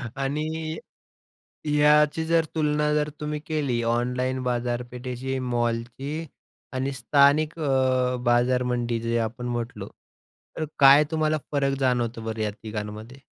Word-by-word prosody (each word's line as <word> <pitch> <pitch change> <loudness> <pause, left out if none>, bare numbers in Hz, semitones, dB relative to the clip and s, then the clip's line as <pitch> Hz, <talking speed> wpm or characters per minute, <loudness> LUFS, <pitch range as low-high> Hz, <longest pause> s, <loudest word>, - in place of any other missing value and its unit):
आणि 155 +3 -2 0.9
ह्याची 150 +1 +4
जर 165 0 +3
तुलना 150 -1 +1
जर 150 0 +1
तुम्ही 150 0 -3
केली 140 -7 -1
ऑनलाईन 125 +2 0
बाजारपेठेची, 125 +1 -3
मॉलची 120 +5 -2 0.5
आणि 130 +1 -2
स्थानिक 140 +5 +3
अ, 130 -3 +1
बाजार 120 +1 +3
मंडी 120 -2 -1
जे 115 +1 0
आपण 115 +2 -3
म्हटलं. 115 -4 -4 0.7
तर 160 - -1
काय 140 +2 +8
तुम्हाला 155 -1 +1
फरक 140 -1 +1
जाणवतो 120 -3 0
बरं 110 0 -4
या 105 - 0
तिघांमध्ये? 105 +3 -7
130 Hz, 115 wpm, -25 LUFS, 120-150 Hz, 0.9 s, काय